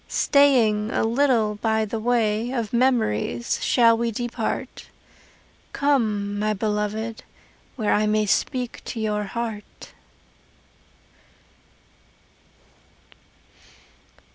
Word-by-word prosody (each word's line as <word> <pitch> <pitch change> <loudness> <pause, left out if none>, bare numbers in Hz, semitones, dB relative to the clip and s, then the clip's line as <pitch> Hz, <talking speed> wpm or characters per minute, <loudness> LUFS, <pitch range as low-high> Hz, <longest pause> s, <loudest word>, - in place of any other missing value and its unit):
Staying 235 -7 +3
a - - 0
little 225 -3 +1
by 220 -1 +1
the 220 +1 -4
way 225 -1 0
Of 235 -5 -3
memories 225 - 0
shall 230 -2 +4
we 235 +1 -1
depart. 240 +2 -4 0.9
Come, 215 -8 0
my 215 0 0
beloved, 215 +2 -3 0.5
where 220 -5 0
I 215 0 +2
may 215 0 +1
Speak 245 +4 -1
to 235 - -5
your 210 -1 -1
heart. 225 0 -7
220 Hz, 90 wpm, -23 LUFS, 210-240 Hz, 0.9 s, shall